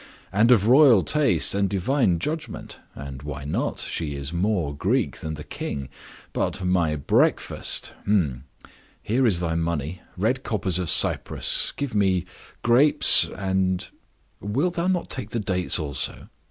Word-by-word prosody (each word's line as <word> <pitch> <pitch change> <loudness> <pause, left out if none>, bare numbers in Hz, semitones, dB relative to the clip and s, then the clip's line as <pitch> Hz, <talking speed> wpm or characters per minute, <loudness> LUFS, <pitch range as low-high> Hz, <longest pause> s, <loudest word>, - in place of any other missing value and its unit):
"And 105 +5 +3
of 110 -5 +5
royal 125 -5 +6
taste 135 - +2
and 100 -1 0
divine 100 0 +1
judgment. 155 - -5 0.2
And 70 -1 -8
why 70 -1 -7
not? 75 - -2
She 75 -4 -3
is 70 +3 -5
more 85 -5 -1
Greek - - 0
than 80 -1 -5
the 75 - -8
king. 70 -2 -6 0.4
But—my 90 -4 0
breakfast! 70 - +1 1.1
Here 125 +4 +1
is 90 -6 +3
thy 85 -2 -1
money—red 85 - -2
coppers 95 -7 -1
of 90 -3 -2
Cyprus. - - +2
Give 140 -4 -4
me 95 -4 +1 0.4
grapes, 125 +6 +4
and—" 95 -2 -1 0.5
"Wilt 135 - -1
thou 175 0 -1
not 185 -2 -1
take 125 -5 -4
the 115 - -2
dates 90 -3 +1
also?" 70 -5 -4
95 Hz, 135 wpm, -24 LUFS, 80-120 Hz, 1.1 s, royal